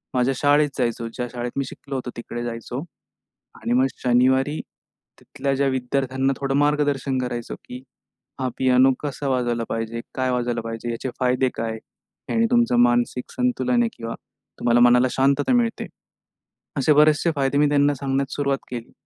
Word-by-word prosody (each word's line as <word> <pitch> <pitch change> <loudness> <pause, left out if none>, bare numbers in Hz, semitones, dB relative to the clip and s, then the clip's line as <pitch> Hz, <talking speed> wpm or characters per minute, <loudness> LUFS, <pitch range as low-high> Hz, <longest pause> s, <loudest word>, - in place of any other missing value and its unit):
माझ्या 125 +1 +2
शाळेत 145 +1 +3
जायचो. 115 -2 -1
ज्या 125 -1 -3
शाळेत, 120 0 -4
मी 140 - 0
शिकलो 135 +2 -8
होतो 130 -1 -4
तिकडे 120 0 -5
जायचो 120 +1 -5 0.8
आणि 120 - -1
मग 130 +2 +4 0.2
शनिवारी, 130 +4 +3 0.6
तिथल्या, 140 0 -3
ज्या 140 +1 +1
विद्यार्थ्यांना 130 +1 0
थोडं 135 -1 -1
मार्गदर्शन 145 -2 +1
करायचो, 120 -2 -4
की 125 +1 -9 0.6
हा 130 - 0
पियानो 130 +1 +5
कसा 145 -1 -4
वाजवायला 120 -3 0
पाहिजे, 115 +1 -3
काय 130 -1 0
वाजवायला 120 -1 -1
पाहिजे, 115 +1 -5
याचे 115 +3 -4
फायदे 125 +1 +2
काय? 110 0 -3 0.6
आणि 230 0 +3
तुमचं, 235 - +3
मानसिक 120 +1 +2
संतुलन 250 -1 +1
आहे 235 - +1
किंवा 115 0 -5 0.5
तुम्हाला 120 0 +3
मनाला 125 +1 +4
शांतता 140 - +2
मिळते, 235 -2 0 0.9
असे 140 +3 +4
बरेचसे 155 +3 +4
फायदे, 135 0 +1
मी 150 0 +4
त्यांना 145 0 +3
सांगण्यास 135 0 -2
सुरुवात 140 -1 0
केली. 120 -2 -7
130 Hz, 155 wpm, -23 LUFS, 120-140 Hz, 0.9 s, पियानो